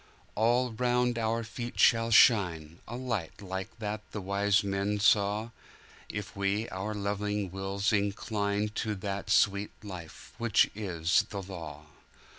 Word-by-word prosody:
All 120 +3 +2
round 125 +1 +1
about 115 - -2
our 115 +1 -1
feet 120 +2 -6
shall 115 -1 +5
shineA 85 -9 +4 0.2
light 115 -9 -3
like 95 +3 -6
that 105 -1 -4
the 105 - -3
wise 100 +1 +2
men 100 +1 -1
saw, 105 +2 +3 0.6
If 105 +1 -6
we 100 +3 0
our 105 +3 -4
loving 105 -1 -2
wills 95 +2 -1
inclineTo 105 0 -1
that 100 0 -4
sweet 100 0 +3
Life 90 -6 -9
which 115 -3 +3
is 90 -5 +1
the 100 -1 -5
Law. 80 -6 -8
105 Hz, 130 wpm, -30 LUFS, 95-110 Hz, 0.6 s, shall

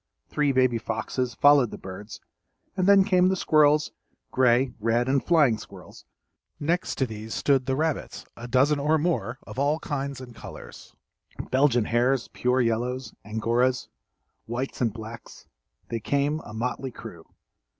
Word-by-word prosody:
Three 150 -2 +1
baby 130 -3 +2
foxes 110 +2 -3
followed 145 -3 +5
the - - -8
birds 95 +3 -9 0.6
and 185 -1 0
then 200 -1 +7
came 185 -2 +3
the 190 - +1
squirrels, 150 -3 +3 0.4
gray, 125 0 +3
red, 115 +3 +1
and 135 0 +1
flying 145 -10 +3
squirrels; - - -13 0.5
next 170 +5 -1
to 135 - +1
these 110 -1 -7
stood 135 -2 +1
the 135 - +1
rabbits, 155 0 -2
a 120 - -8
dozen 135 +4 +3
or 150 +3 +2
more 130 - -1
of - - -7
all 145 +2 +2
kinds 140 -4 -4
and 125 -2 -10
colors: - - -11 0.6
Belgian 130 -4 +3
hares, 120 +2 +1
pure 125 +1 +1
yellows, 120 +3 -1
angoras, 115 +4 0 0.6
whites 125 +4 -4
and 115 -3 +2
blacks, 110 +1 -10 0.4
they 115 - -2
came, 145 +6 0
a - - -9
motley 125 +4 -3
crew. 110 -9 -11
130 Hz, 150 wpm, -26 LUFS, 115-145 Hz, 0.6 s, then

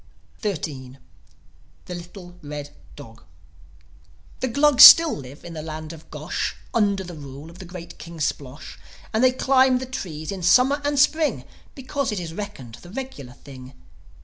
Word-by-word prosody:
XIII. 145 - -5 0.9
THE 180 - -7
LITTLE 175 +1 -10
RED 145 -1 -7 0.2
DOG 115 - -13 1.2
The 260 - -1
Glugs 285 +2 +5
still 330 -2 +10
live 140 +3 -11
in 170 - -8
the 155 - -6
land 155 0 -7
of 160 -1 -15
Gosh, - - -4 0.2
Under 200 -4 +1
the 175 -1 -9
rule 145 +1 -10
of 175 - -16
the 190 - -9
great 175 -1 -10
King 170 -1 -10
Splosh. 140 -1 -5 0.3
And 220 +3 +1
they 255 - +6
climb 260 0 +3
the 260 - -4
trees 165 -11 -6
in 195 - -5
the 175 - -1
Summer 265 +9 +4
and 290 0 -1
Spring, 310 +3 +2 0.3
Because 270 -2 -3
it 210 - -3
is 165 -2 -6
reckoned 135 - -8
the 175 - -13
regular 195 - -8
thing. 130 -1 -13
175 Hz, 165 wpm, -23 LUFS, -, 1.2 s, still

